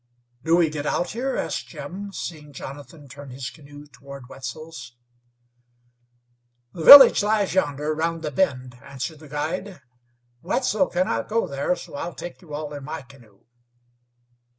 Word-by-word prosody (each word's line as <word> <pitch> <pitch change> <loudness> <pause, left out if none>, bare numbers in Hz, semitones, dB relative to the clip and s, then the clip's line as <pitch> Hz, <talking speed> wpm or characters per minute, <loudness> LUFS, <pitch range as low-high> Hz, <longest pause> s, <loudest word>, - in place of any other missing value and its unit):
"Do 165 +1 +3
we 165 -3 +2
get 150 -1 -4
out 175 - -1
here?" 260 +4 -2
asked - - -3
Jim, 200 +2 -8
seeing 150 -6 -7
Jonathan 145 +3 -10
turn 140 +1 -11
his 130 0 -6
canoe 145 -1 -14
toward 140 -3 -12
Wetzel's. 135 +1 -9 1.8
"The 165 - -6
village 270 - +11
lies 210 -3 +1
yonder, 150 -4 0
around 165 +1 -2
the 150 - -3
bend," 130 -7 -1
answered 140 +3 -7
the 155 -1 -14
guide. 155 +5 -4 0.6
"Wetzel 210 0 0
cannot 175 -11 -1
go 225 +1 +1
there, 140 +5 -1
so - - -12
I'll 165 +5 -5
take 175 - -9
you 155 -5 -9
all 150 0 -6
in 145 -1 -7
my 155 +2 -6
canoe." 120 -7 -20
150 Hz, 150 wpm, -23 LUFS, 140-175 Hz, 1.8 s, village